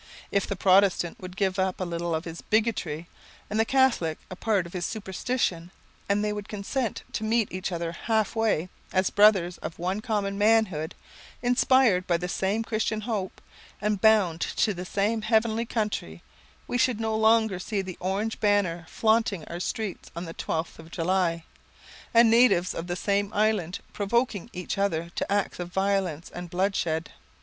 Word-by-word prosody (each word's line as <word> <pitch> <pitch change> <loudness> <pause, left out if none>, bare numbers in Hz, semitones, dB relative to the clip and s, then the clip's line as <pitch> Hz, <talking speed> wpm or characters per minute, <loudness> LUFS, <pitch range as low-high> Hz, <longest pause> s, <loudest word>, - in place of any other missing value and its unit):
If 200 - +1
the 200 - -2
Protestant 185 -2 +3
would 185 0 -9
give 190 -1 0
up 190 -1 0
a - - -1
little 170 -1 -2
of 160 - -3
his 165 0 -7
bigotry, 210 -8 0 0.4
and 215 - 0
the 225 - +4
Catholic 250 -12 +2
a - - -5
part 200 -2 +1
of 170 - -11
his 180 -2 -3
superstition, 190 -3 -2 0.4
and 205 +1 +2
they 210 - 0
would 210 0 -6
consent 215 +4 -3
to - - -2
meet 220 -1 +1
each 185 +1 -3
other 170 -1 -2
half 220 +4 0
way, 215 -6 +1 0.2
as 185 0 +1
brothers 195 -4 +4
of 160 - -6
one 185 +4 -2
common 205 -4 -1
manhood, 205 -8 +2 0.5
inspired 245 -5 +4
by 170 - +3
the 180 +1 -4
same 195 +5 0
Christian 220 -1 -1
hope, 210 -4 -3 0.4
and 210 -1 -1
bound 200 -7 +4
to 215 - +1
the 180 0 -6
same 210 +4 0
heavenly 225 +1 +1
country, 210 - -3 0.4
we 245 - -1
should 240 -2 +2
no 220 -1 -1
longer 220 -3 +3
see 200 +1 -2
the 185 -2 -7
orange 200 +4 -2
banner 185 -6 +1
flaunting 220 -6 +1
our 170 - -5
streets 215 +1 -4
on 170 +1 -4
the 165 - -7
twelfth 160 0 -3
of 160 0 -12
July, 170 -1 0 0.7
and 230 -1 +6
natives 230 -7 +4
of 165 - -5
the 175 - -2
same 200 +2 0
island 205 -5 +1 0.2
provoking 215 -1 0
each 180 +2 -4
other 170 -4 0
to - - -2
acts 200 -2 0
of 175 0 -5
violence 190 -4 -1
and 175 0 -7
bloodshed. 175 -3 -1
195 Hz, 175 wpm, -27 LUFS, 175-220 Hz, 0.7 s, and